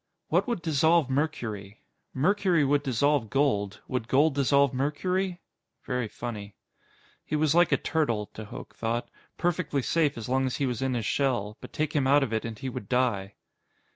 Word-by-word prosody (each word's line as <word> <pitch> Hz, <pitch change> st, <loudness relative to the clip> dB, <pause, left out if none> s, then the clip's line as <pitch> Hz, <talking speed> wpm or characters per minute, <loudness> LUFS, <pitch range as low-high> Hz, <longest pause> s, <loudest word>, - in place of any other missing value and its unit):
What -, -, +2 dB
would 235 Hz, -8 st, -2 dB
dissolve 160 Hz, -1 st, +3 dB
mercury? 115 Hz, -8 st, -3 dB, 0.3 s
Mercury 180 Hz, +1 st, +2 dB
would 145 Hz, +1 st, +2 dB
dissolve 140 Hz, -2 st, +1 dB
gold. 105 Hz, -8 st, 0 dB
Would 125 Hz, -3 st, -2 dB
gold 140 Hz, +5 st, +4 dB
dissolve 140 Hz, 0 st, +3 dB
mercury? 175 Hz, +7 st, -1 dB, 0.4 s
Very 125 Hz, -3 st, -1 dB
funny. 105 Hz, -3 st, -7 dB, 0.7 s
He -, -, -3 dB
was 150 Hz, -1 st, +2 dB
like 175 Hz, +1 st, +4 dB
a -, -, +4 dB
turtle, 120 Hz, -, 0 dB
de 110 Hz, -, -7 dB
Hooch 120 Hz, +4 st, -9 dB
thought. 120 Hz, +1 st, -3 dB, 0.3 s
Perfectly 165 Hz, -6 st, 0 dB
safe 150 Hz, -3 st, +1 dB
as 115 Hz, -, -5 dB
long 130 Hz, +1 st, +1 dB
as 130 Hz, -, -2 dB
he 140 Hz, -, 0 dB
was 125 Hz, -2 st, -2 dB
in 130 Hz, -1 st, 0 dB
his 115 Hz, -3 st, -2 dB
shell, 120 Hz, -7 st, 0 dB
but -, -, -10 dB
take 155 Hz, +2 st, -2 dB
him 135 Hz, -3 st, +2 dB
out 140 Hz, +1 st, +5 dB
of 115 Hz, -4 st, -3 dB
it 110 Hz, -, -1 dB
and 115 Hz, -2 st, -5 dB
he 130 Hz, -, -5 dB
would 105 Hz, -6 st, -6 dB
die. 110 Hz, -6 st, 0 dB
135 Hz, 180 wpm, -27 LUFS, 115-150 Hz, 0.7 s, out